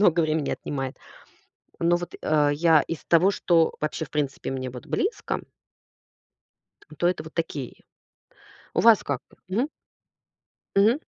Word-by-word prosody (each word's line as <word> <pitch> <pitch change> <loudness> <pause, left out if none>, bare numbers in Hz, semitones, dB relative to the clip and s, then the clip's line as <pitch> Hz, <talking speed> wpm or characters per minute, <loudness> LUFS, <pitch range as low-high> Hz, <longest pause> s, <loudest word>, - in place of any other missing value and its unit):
много 175 -4 +5
времени 155 -2 0
отнимает. 135 -2 -4 0.8
Но 170 +1 +3
вот, 175 0 -5
э, 150 -1 +3
я 160 0 +5
из 165 - -6
того, 175 +4 +5
что 170 -4 +2
вообще, 155 +1 -2
в - - -18
принципе, 140 -3 -2
мне 130 -1 -3
вот 125 -1 -9
близко 405 +5 -1 1.6
то 175 - +2
это 180 - -1
вот 160 - -11
такие. 150 -6 -4 0.9
У - - +1
вас 230 -2 +6
как? 140 -3 -2 0.3
Мгм. 230 +10 0 1.1
Мгм. 225 +8 +5
160 Hz, 135 wpm, -25 LUFS, 145-180 Hz, 1.6 s, вас